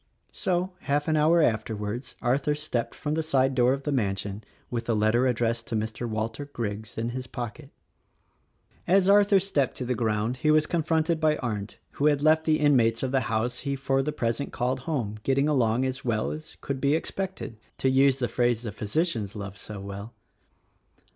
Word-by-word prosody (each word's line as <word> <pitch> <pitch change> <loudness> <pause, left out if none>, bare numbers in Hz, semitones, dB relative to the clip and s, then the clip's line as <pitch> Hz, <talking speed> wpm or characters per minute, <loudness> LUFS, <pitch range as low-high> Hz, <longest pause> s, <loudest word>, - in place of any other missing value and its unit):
So, 180 +1 -1
half 145 0 0
an 155 - +2
hour 160 +2 +4
afterwards, 110 +1 -2
Arthur 135 +4 +1
stepped 145 -6 -3
from 150 - -3
the 160 - +1
side 135 -4 +2
door 125 -1 +4
of 135 +1 -1
the 145 - -1
mansion 100 -4 -1 0.3
with 120 -1 -2
the 115 - +1
letter 110 +4 +3
addressed 115 -1 0
to 115 - -3
Mr. 110 +2 -3
Walter 110 +5 -3
Griggs 110 -6 -5
in 115 +1 -1
his 125 +1 -5
pocket. 125 +4 -6 1.2
As 190 +1 +4
Arthur 200 0 +6
stepped 150 -9 0
to 125 - -3
the 125 - 0
ground 110 +1 0
he 155 - +1
was 155 0 +5
confronted 160 0 +1
by 155 -1 +3
Arndt 105 -4 -4
who 145 - +1
had 145 -1 +2
left 160 +1 +4
the 155 -1 +3
inmates 120 -6 +3
of 130 - -1
the 135 - +3
house 115 +3 0
he 140 -1 -2
for 135 0 +1
the 150 +3 -1
present 115 +1 -2
called 125 +2 -1
home 125 -8 -3
getting 135 +4 +2
along 125 -4 +2
as 130 0 -3
well 110 -3 0
as 155 0 -8
could 135 -1 -3
be 140 +2 +3
expected 185 - -4
— - - -38
to - - 0
use 135 0 +4
the 125 -2 0
phrase 120 -1 +1
the 110 - -4
physicians 110 - -1
love 100 -1 -6
so 105 0 -8
well. 100 +3 -7
130 Hz, 195 wpm, -27 LUFS, 115-150 Hz, 1.2 s, Arthur